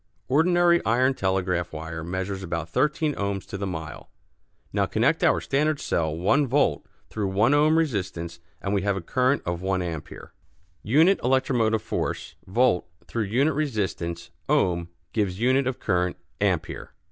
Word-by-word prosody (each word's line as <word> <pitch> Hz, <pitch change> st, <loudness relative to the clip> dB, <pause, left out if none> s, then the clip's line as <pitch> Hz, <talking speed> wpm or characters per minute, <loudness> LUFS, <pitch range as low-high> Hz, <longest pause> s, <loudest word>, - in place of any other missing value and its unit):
Ordinary 170 Hz, +4 st, +4 dB
iron 125 Hz, +4 st, +3 dB
telegraph 90 Hz, -5 st, -1 dB
wire 80 Hz, +1 st, -6 dB
measures 95 Hz, +3 st, -3 dB
about 85 Hz, -3 st, -4 dB
thirteen 150 Hz, -, +1 dB
ohms 100 Hz, -4 st, -3 dB
to -, -, -8 dB
the 100 Hz, 0 st, -3 dB
mile. 80 Hz, -4 st, -6 dB, 0.6 s
Now -, -, +1 dB
connect -, -, +1 dB
our -, -, +4 dB
standard 150 Hz, +1 st, 0 dB
cell 80 Hz, -, -1 dB
one 135 Hz, -, +2 dB
volt 140 Hz, +4 st, +1 dB, 0.2 s
through 105 Hz, -2 st, -2 dB
one 105 Hz, +8 st, +3 dB
ohm 155 Hz, +2 st, +4 dB
resistance 95 Hz, -, -2 dB, 0.2 s
and 100 Hz, -, -1 dB
we 100 Hz, -, +2 dB
have 100 Hz, 0 st, 0 dB
a -, -, -3 dB
current 130 Hz, +10 st, +1 dB
of 85 Hz, 0 st, -2 dB
one 95 Hz, 0 st, 0 dB
ampère. 85 Hz, -4 st, -6 dB, 0.5 s
Unit 160 Hz, -, +4 dB
electromotive 120 Hz, -4 st, +2 dB
force -, -, -3 dB
(volt) 105 Hz, -3 st, +2 dB, 0.2 s
through 115 Hz, -2 st, -2 dB
unit 135 Hz, +9 st, +2 dB
resistance 100 Hz, -, -2 dB, 0.2 s
(ohm) 85 Hz, -1 st, +2 dB, 0.3 s
gives 100 Hz, -4 st, -1 dB
unit 130 Hz, +3 st, +3 dB
of 130 Hz, -, -2 dB
current 90 Hz, -2 st, 0 dB, 0.2 s
(ampère). -, -, -1 dB
100 Hz, 150 wpm, -25 LUFS, 90-135 Hz, 0.6 s, Ordinary